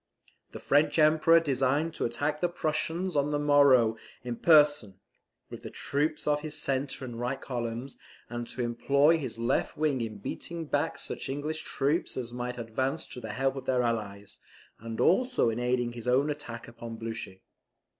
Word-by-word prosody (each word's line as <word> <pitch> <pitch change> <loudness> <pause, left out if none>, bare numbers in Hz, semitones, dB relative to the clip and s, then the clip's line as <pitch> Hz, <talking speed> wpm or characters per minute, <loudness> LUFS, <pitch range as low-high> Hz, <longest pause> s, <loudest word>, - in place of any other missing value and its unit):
The - - -8
French 145 +2 +2
Emperor 160 +2 +6
designed 145 +1 0
to - - -2
attack 145 +6 -2
the 175 - +2
Prussians 170 +2 -2
on 145 0 +2
the 150 - 0
morrow 140 -6 +5 0.3
in 120 -1 -3
person, 145 - +4 0.6
with - - -8
the - - -7
troops 150 +2 -1
of 150 0 +2
his 155 0 -3
centre 135 0 -2
and 120 -2 -7
right 125 +3 -2
columns, 120 +1 -5 0.3
and 120 0 -5
to 125 - -4
employ 140 +7 +3
his 130 -6 -5
left 115 +3 0
wing 150 -4 +1
in 110 -2 -4
beating 165 +10 -5
back - - -1
such - - -6
English 150 +3 -3
troops 145 +5 -1
as 120 -2 -4
might 125 0 -4
advance 130 +6 -2
to - - -7
the 110 -2 -6
help 135 +1 0
of 135 -1 -6
their 125 -2 +2
allies, 105 -4 -3 0.4
and 115 0 -6
also 245 - +3
in 115 - -3
aiding 125 -1 0
his 120 0 -8
own 135 +4 +3
attack 130 -6 -7
upon 115 -1 -8
Blucher. 115 -4 -6
135 Hz, 175 wpm, -29 LUFS, 120-150 Hz, 0.6 s, Emperor